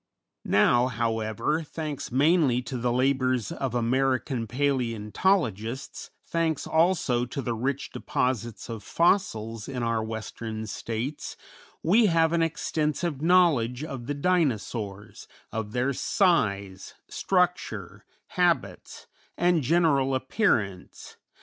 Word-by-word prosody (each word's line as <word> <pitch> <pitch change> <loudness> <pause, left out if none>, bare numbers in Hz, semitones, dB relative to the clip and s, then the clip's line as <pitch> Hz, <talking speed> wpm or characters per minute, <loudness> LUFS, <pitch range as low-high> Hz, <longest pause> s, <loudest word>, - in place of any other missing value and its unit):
Now, 120 +1 +3
however, 115 +4 -1
thanks 155 -3 -6
mainly 140 -2 +3
to 130 - -5
the 120 +1 0
labors 130 -2 +1
of 130 -3 -3
American 130 0 0
palæontologists, 125 - -1 0.2
thanks 165 -3 -1
also 160 -8 +2
to 125 - -6
the 120 -3 -2
rich 135 +5 -3
deposits 120 -3 -2
of 115 -3 -6
fossils 115 - 0
in 125 -3 -3
our 115 -1 0
Western 110 0 -5
States, 115 +7 -5 0.5
we 210 +7 +5
have 165 -2 +3
an 170 - +2
extensive 155 -1 -1
knowledge 155 -8 +3
of 135 -6 -6
the 145 - -2
Dinosaurs, 115 - -1 0.2
of 110 -2 -4
their 125 +4 0
size, 100 - 0
structure, 180 - -1 0.3
habits, - - -1 0.3
and 175 -2 +3
general 140 -3 +2
appearance. 125 - -1
130 Hz, 105 wpm, -26 LUFS, 115-160 Hz, 0.5 s, we